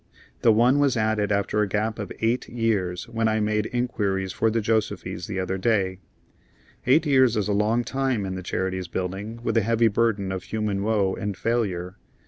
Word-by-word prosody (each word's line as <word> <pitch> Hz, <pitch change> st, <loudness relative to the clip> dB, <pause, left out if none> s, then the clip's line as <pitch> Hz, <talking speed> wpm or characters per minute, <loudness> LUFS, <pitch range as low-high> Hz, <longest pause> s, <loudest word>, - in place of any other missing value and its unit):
That 115 Hz, -, +5 dB
one 125 Hz, +6 st, +4 dB
was 140 Hz, -4 st, +2 dB
added 110 Hz, -1 st, +1 dB
after 100 Hz, +1 st, +1 dB
a 105 Hz, -, +1 dB
gap 110 Hz, +3 st, -1 dB
of 105 Hz, -, -5 dB
eight 115 Hz, +3 st, 0 dB
years 105 Hz, -7 st, -1 dB
when 115 Hz, -1 st, 0 dB
I 110 Hz, 0 st, +1 dB
made 105 Hz, 0 st, 0 dB
inquiries 100 Hz, -6 st, -1 dB
for 115 Hz, -, +1 dB
the 115 Hz, +1 st, 0 dB
Josefys 110 Hz, -4 st, -1 dB
the 100 Hz, -3 st, -3 dB
other 95 Hz, +1 st, -2 dB
day. 95 Hz, -3 st, +1 dB, 0.9 s
Eight 150 Hz, +6 st, +5 dB
years 130 Hz, -5 st, +4 dB
is 105 Hz, -, 0 dB
a 105 Hz, -, +1 dB
long 110 Hz, +4 st, +2 dB
time 130 Hz, -5 st, -1 dB
in 95 Hz, -, -3 dB
the 95 Hz, -, -5 dB
Charities 95 Hz, 0 st, -2 dB
Buildings 100 Hz, +7 st, -5 dB
with 115 Hz, -1 st, 0 dB
a -, -, +5 dB
heavy 115 Hz, +2 st, +3 dB
burden 100 Hz, -3 st, 0 dB
of 95 Hz, -1 st, -4 dB
human 105 Hz, -3 st, -2 dB
woe 100 Hz, -3 st, +1 dB
and 100 Hz, -1 st, -4 dB
failure. 95 Hz, -4 st, -1 dB
105 Hz, 190 wpm, -25 LUFS, 95-115 Hz, 0.9 s, That